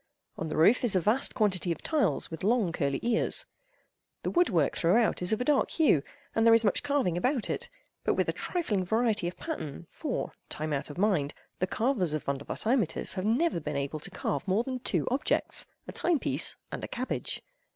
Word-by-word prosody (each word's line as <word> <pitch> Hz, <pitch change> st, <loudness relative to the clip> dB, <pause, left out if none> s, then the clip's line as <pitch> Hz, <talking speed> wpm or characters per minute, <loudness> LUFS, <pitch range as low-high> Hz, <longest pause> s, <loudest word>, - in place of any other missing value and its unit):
On 160 Hz, -, -4 dB
the -, -, -3 dB
roof 205 Hz, +12 st, +5 dB
is 230 Hz, -5 st, +5 dB
a -, -, +5 dB
vast 215 Hz, -, +1 dB
quantity 190 Hz, -5 st, +1 dB
of 165 Hz, -, -4 dB
tiles 270 Hz, -, +1 dB
with 165 Hz, -, -7 dB
long 215 Hz, -3 st, +2 dB
curly 140 Hz, -4 st, -1 dB
ears. 240 Hz, -, +1 dB, 0.8 s
The -, -, -1 dB
woodwork, 185 Hz, -, +2 dB
throughout, 210 Hz, +7 st, +2 dB
is 180 Hz, -, +1 dB
of 220 Hz, -, +1 dB
a 250 Hz, -, -1 dB
dark 290 Hz, -1 st, +3 dB
hue 295 Hz, -, +3 dB, 0.3 s
and 225 Hz, -, +2 dB
there 230 Hz, 0 st, +7 dB
is 230 Hz, 0 st, +4 dB
much 205 Hz, -, +2 dB
carving 275 Hz, -, 0 dB
about 255 Hz, +2 st, 0 dB
it, -, -, -3 dB, 0.4 s
with -, -, +3 dB
but -, -, +2 dB
a -, -, 0 dB
trifling 230 Hz, -, -1 dB
variety 220 Hz, -1 st, +1 dB
of 175 Hz, -, -6 dB
pattern 170 Hz, -, -5 dB
for, 295 Hz, -5 st, -3 dB, 0.2 s
time 155 Hz, 0 st, -3 dB
out 140 Hz, -, -2 dB
of 145 Hz, -, -8 dB
mind, 180 Hz, -8 st, +1 dB, 0.2 s
the 185 Hz, -, +1 dB
carvers 210 Hz, -, 0 dB
of 155 Hz, -, -3 dB
Vondervotteimittiss 160 Hz, -, -1 dB
have 185 Hz, 0 st, -3 dB
never 245 Hz, -, +2 dB
been 150 Hz, -2 st, -3 dB
able 140 Hz, +2 st, -3 dB
to 195 Hz, -, -4 dB
carve 145 Hz, -6 st, -3 dB
more 195 Hz, +5 st, +2 dB
than 255 Hz, 0 st, -4 dB
two 250 Hz, -, 0 dB
objects—a 270 Hz, +4 st, -1 dB
time 345 Hz, -2 st, +1 dB
piece -, -, +1 dB, 0.2 s
and -, -, -5 dB
a -, -, -3 dB
cabbage. 255 Hz, +1 st, -3 dB
210 Hz, 200 wpm, -29 LUFS, 165-250 Hz, 0.8 s, there